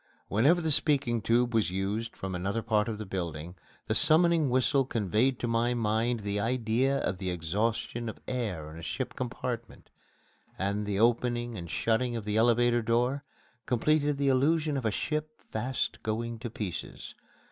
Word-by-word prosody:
Whenever 140 Hz, -, +4 dB
the 160 Hz, -1 st, 0 dB
speaking 135 Hz, -6 st, +2 dB
tube 120 Hz, +2 st, +2 dB
was 110 Hz, -4 st, +2 dB
used 100 Hz, +5 st, -3 dB
from 95 Hz, -1 st, -4 dB
another 100 Hz, +5 st, -2 dB
part 110 Hz, -1 st, +1 dB
of 110 Hz, -2 st, -3 dB
the 110 Hz, -, -6 dB
building, 85 Hz, -3 st, -4 dB, 0.3 s
the -, -, 0 dB
summoning 165 Hz, -2 st, +5 dB
whistle 130 Hz, +2 st, +3 dB
conveyed 115 Hz, +2 st, +1 dB
to 120 Hz, -, -3 dB
my 115 Hz, +1 st, +1 dB
mind 115 Hz, +1 st, 0 dB
the 100 Hz, 0 st, -2 dB
idea 125 Hz, +4 st, +1 dB
of 90 Hz, 0 st, -2 dB
the 95 Hz, -2 st, -2 dB
exhaustion 105 Hz, +7 st, -2 dB
of -, -, -9 dB
air 105 Hz, -12 st, -3 dB
in 80 Hz, -, -9 dB
a -, -, -9 dB
ship 80 Hz, -, -4 dB
compartment, 120 Hz, -1 st, -5 dB, 0.7 s
and 100 Hz, +2 st, -1 dB
the 100 Hz, -1 st, -1 dB
opening 120 Hz, +1 st, +1 dB
and 85 Hz, -4 st, -7 dB
shutting 120 Hz, +5 st, 0 dB
of 115 Hz, -3 st, -4 dB
the 105 Hz, 0 st, -1 dB
elevator 120 Hz, +1 st, +4 dB
door 125 Hz, +5 st, +1 dB, 0.4 s
completed 145 Hz, +3 st, +2 dB
the 140 Hz, 0 st, 0 dB
illusion 150 Hz, +3 st, +2 dB
of 135 Hz, -4 st, -2 dB
a -, -, +3 dB
ship 155 Hz, +7 st, -3 dB
fast 120 Hz, +4 st, -2 dB
going 115 Hz, +1 st, -3 dB
to 120 Hz, -, -5 dB
pieces. 100 Hz, -6 st, -6 dB
115 Hz, 170 wpm, -29 LUFS, 105-130 Hz, 0.7 s, summoning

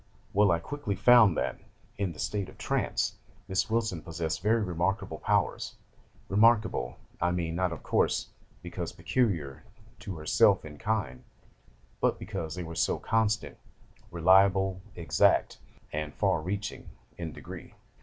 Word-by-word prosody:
'Well, 105 Hz, +1 st, +5 dB
I 85 Hz, -, +4 dB
quickly 110 Hz, -, -4 dB
found 110 Hz, -8 st, +6 dB
that, -, -, -2 dB, 0.4 s
in 100 Hz, -3 st, -2 dB
the 80 Hz, -, -12 dB
state 100 Hz, +3 st, -2 dB
of -, -, -15 dB
trance, -, -, -1 dB, 0.3 s
Miss 95 Hz, +2 st, 0 dB
Wilson 110 Hz, -7 st, 0 dB
possessed 80 Hz, -1 st, -3 dB
very 110 Hz, +3 st, +2 dB
remarkable 90 Hz, -1 st, -2 dB
powers: -, -, 0 dB, 0.5 s
remarkable, 105 Hz, -, +3 dB, 0.2 s
I 90 Hz, -, +3 dB
mean, 85 Hz, -2 st, -2 dB
not, 90 Hz, +1 st, 0 dB
of 85 Hz, -, -7 dB
course, -, -, +1 dB, 0.3 s
because -, -, -5 dB
peculiar 80 Hz, -, -1 dB, 0.4 s
to 95 Hz, -, -6 dB
herself 75 Hz, 0 st, +3 dB
in 75 Hz, -1 st, -10 dB
kind, 105 Hz, -, -2 dB, 0.8 s
but -, -, +2 dB
because 80 Hz, -1 st, -5 dB
they 90 Hz, -, -4 dB
were 85 Hz, 0 st, -7 dB
so 80 Hz, -, +1 dB
constant, 110 Hz, -1 st, 0 dB, 0.5 s
reliable, 95 Hz, +2 st, +4 dB
exact, 85 Hz, -, +2 dB, 0.3 s
and 75 Hz, 0 st, -3 dB
far 80 Hz, -, +1 dB
reaching, 100 Hz, +5 st, -4 dB, 0.3 s
in 85 Hz, -2 st, -4 dB
degree. -, -, -10 dB
95 Hz, 135 wpm, -29 LUFS, 80-105 Hz, 0.8 s, found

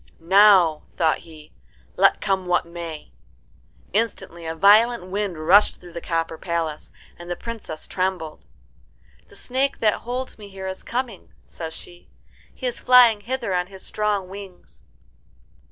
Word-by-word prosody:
"Now," 185 Hz, -2 st, +5 dB, 0.2 s
thought 160 Hz, -2 st, +2 dB
he, 155 Hz, -2 st, -15 dB, 0.4 s
"let -, -, +4 dB
come 190 Hz, -2 st, -1 dB
what 175 Hz, 0 st, +2 dB
may." 170 Hz, -, -8 dB, 0.8 s
Instantly 195 Hz, -6 st, -2 dB
a 160 Hz, -, -3 dB
violent 215 Hz, +4 st, +5 dB
wind 200 Hz, -3 st, -2 dB
rushed 180 Hz, +7 st, +4 dB
through 175 Hz, -1 st, -13 dB
the 170 Hz, -, -6 dB
copper 165 Hz, -1 st, -2 dB
palace, 165 Hz, -3 st, -3 dB, 0.3 s
and 175 Hz, 0 st, -10 dB
the 175 Hz, -, -2 dB
Princess 215 Hz, -8 st, -7 dB
trembled. 185 Hz, -4 st, -3 dB, 0.8 s
"The -, -, -18 dB
snake 270 Hz, +2 st, -1 dB
that 215 Hz, -2 st, +2 dB
holds 250 Hz, 0 st, -5 dB
me 205 Hz, -1 st, -10 dB
here 190 Hz, -1 st, -8 dB
is 190 Hz, 0 st, -5 dB
coming," 240 Hz, -5 st, -5 dB
says 160 Hz, -1 st, -8 dB
she. 175 Hz, 0 st, -13 dB, 0.4 s
"He 260 Hz, -, -9 dB
is 245 Hz, -, -2 dB
flying 245 Hz, -4 st, +6 dB
hither 235 Hz, -3 st, -3 dB
on 180 Hz, 0 st, 0 dB
his 190 Hz, -1 st, -10 dB
strong 210 Hz, -3 st, -1 dB
wings." 195 Hz, -1 st, -11 dB
190 Hz, 145 wpm, -23 LUFS, 170-215 Hz, 0.8 s, flying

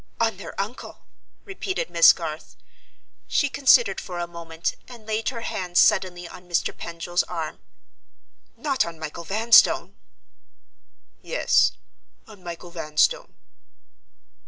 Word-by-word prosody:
"On 225 Hz, -4 st, +1 dB
their 200 Hz, -, -9 dB
uncle?" 210 Hz, +6 st, -6 dB, 0.4 s
repeated 385 Hz, -, -4 dB
Miss 170 Hz, -1 st, +8 dB
Garth. 160 Hz, -2 st, -7 dB, 0.7 s
She 285 Hz, -, +1 dB
considered 255 Hz, -7 st, +4 dB
for 180 Hz, -, -7 dB
a 175 Hz, -, -2 dB
moment, 170 Hz, -1 st, -5 dB
and 235 Hz, -3 st, -13 dB
laid 220 Hz, +1 st, -1 dB
her 235 Hz, -3 st, -6 dB
hand 180 Hz, -5 st, -4 dB
suddenly 180 Hz, -2 st, +3 dB
on 180 Hz, +1 st, -13 dB
Mr. 170 Hz, -, 0 dB
Pendril's 170 Hz, +1 st, -2 dB
arm. 165 Hz, -3 st, -5 dB, 1.0 s
"Not 280 Hz, -4 st, 0 dB
on 170 Hz, -1 st, -8 dB
Michael 160 Hz, +1 st, -7 dB
Vanstone!" 220 Hz, +6 st, +4 dB, 1.3 s
"Yes: -, -, +2 dB, 0.5 s
on 205 Hz, -4 st, -16 dB
Michael 175 Hz, 0 st, -8 dB
Vanstone." 155 Hz, -3 st, 0 dB
180 Hz, 115 wpm, -24 LUFS, 170-225 Hz, 1.3 s, Miss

